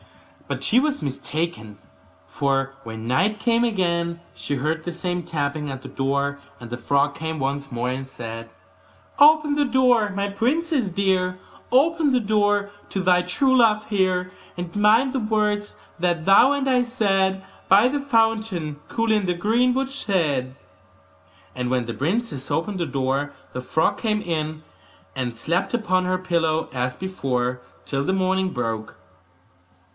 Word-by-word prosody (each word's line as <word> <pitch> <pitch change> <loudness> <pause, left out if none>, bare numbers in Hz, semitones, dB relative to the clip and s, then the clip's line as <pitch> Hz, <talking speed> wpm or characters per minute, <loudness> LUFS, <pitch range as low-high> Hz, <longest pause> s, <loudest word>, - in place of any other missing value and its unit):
But - - -4
she 240 - +4
was 290 +1 -1
mistaken; 140 - -4 0.5
for 135 - -1
when 110 0 -7
night 195 - +1
came 235 +1 +2
again 170 -6 0
she 145 - -3
heard 155 +4 -1
the 175 - -4
same 175 +1 -3
tapping 150 -1 -2
at 135 -1 -6
the - - -7
door; 140 +1 -1 0.2
and 120 -1 -9
the 120 - -3
frog 140 +3 +1
came 160 -1 -4
once 140 0 -2
more, 120 +1 -2
and 130 +1 -3
said: 115 -3 -8 0.7
'Open 300 0 +6
the 290 0 +2
door, 250 -5 +3
my 200 0 -2
princess 260 - 0
dear, 185 -1 0 0.3
Open 305 +3 +3
the 255 - +3
door 205 -2 +1 0.2
to 195 - -3
thy 180 -1 +4
true 260 +9 +1
love 215 -3 +4
here! 185 -3 +1 0.3
And 175 +1 -6
mind 220 +6 +4
the 265 - 0
words 210 -2 0 0.2
that 170 -2 0
thou 200 +7 +6
and 280 -1 0
I 255 -2 +3
said 195 -5 0 0.2
By 200 +5 +7
the 285 +2 -1
fountain 225 - 0
cool, 230 -1 0
in 210 -3 +2
the 180 - +1
greenwood 250 +8 +1
shade.' 150 - -1 1.0
And 125 -1 -2
when 125 -1 0
the 115 - -4
princess 150 - -2
opened 175 +6 -1
the 170 - -1
door 135 +1 -1 0.2
the 125 - -4
frog 160 +5 0
came 215 -2 0
in, 155 -3 -3 0.5
and 125 -3 -3
slept 175 - -1
upon 185 -5 +1
her 185 0 +1
pillow 165 -3 0
as 125 0 -2
before, 125 -9 -2 0.2
till 135 -1 -1
the 190 - 0
morning 190 0 +1
broke. 115 -7 -4
185 Hz, 155 wpm, -23 LUFS, 140-220 Hz, 1.0 s, By